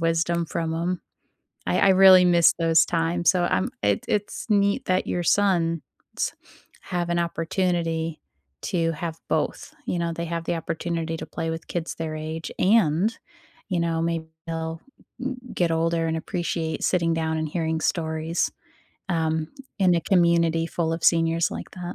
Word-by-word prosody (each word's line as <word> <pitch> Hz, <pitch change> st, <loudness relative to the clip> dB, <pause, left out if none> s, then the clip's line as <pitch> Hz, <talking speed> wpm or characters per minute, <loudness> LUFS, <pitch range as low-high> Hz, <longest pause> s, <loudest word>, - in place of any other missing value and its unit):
wisdom 165 Hz, +1 st, +1 dB
from 165 Hz, 0 st, -2 dB
'em. 170 Hz, +2 st, -2 dB, 0.7 s
I -, -, +2 dB
I 195 Hz, -, +5 dB
really 190 Hz, -1 st, +8 dB
miss 170 Hz, -2 st, +5 dB
those 165 Hz, -1 st, +4 dB
times, 170 Hz, +1 st, +1 dB
so 180 Hz, -2 st, +3 dB
I'm 95 Hz, -, +1 dB
it 100 Hz, -1 st, +1 dB
it's 205 Hz, +2 st, -2 dB
neat 200 Hz, -1 st, +2 dB
that 185 Hz, 0 st, +1 dB
your 175 Hz, -, -1 dB
sons 170 Hz, -4 st, +2 dB, 1.0 s
have 175 Hz, -1 st, -3 dB
an 170 Hz, -, +1 dB
opportunity 165 Hz, -1 st, -1 dB, 0.4 s
to 165 Hz, -3 st, 0 dB
have 165 Hz, 0 st, -5 dB
both, -, -, -2 dB
you 175 Hz, -, -1 dB
know? 170 Hz, 0 st, -1 dB
They 170 Hz, +1 st, -4 dB
have 170 Hz, 0 st, -4 dB
the -, -, -1 dB
opportunity 165 Hz, 0 st, -3 dB
to -, -, -6 dB
play 165 Hz, 0 st, -3 dB
with 165 Hz, +1 st, -6 dB
kids 170 Hz, -2 st, -3 dB
their 160 Hz, -1 st, -4 dB
age 155 Hz, +1 st, -5 dB
and, 195 Hz, +1 st, +3 dB, 0.5 s
you 180 Hz, -3 st, 0 dB
know, 165 Hz, -1 st, 0 dB
may 165 Hz, -1 st, 0 dB, 0.3 s
they'll 165 Hz, 0 st, -4 dB, 0.4 s
m 260 Hz, 0 st, -3 dB, 0.2 s
get 170 Hz, -2 st, +1 dB
older 165 Hz, 0 st, +1 dB
and 160 Hz, 0 st, -1 dB
appreciate 165 Hz, -1 st, -3 dB
sitting 170 Hz, -2 st, +2 dB
down 160 Hz, -1 st, -1 dB
and 155 Hz, 0 st, -1 dB
hearing 160 Hz, -1 st, -1 dB
stories, 160 Hz, 0 st, -1 dB, 0.6 s
um, 160 Hz, -2 st, 0 dB, 0.3 s
in 185 Hz, -3 st, +4 dB
a 170 Hz, -, +2 dB
community 170 Hz, -2 st, +3 dB
full 165 Hz, -1 st, -1 dB
of 165 Hz, 0 st, -4 dB
seniors 165 Hz, 0 st, +3 dB
like -, -, -7 dB
that. 175 Hz, -1 st, -6 dB
165 Hz, 160 wpm, -24 LUFS, 165-175 Hz, 1.0 s, really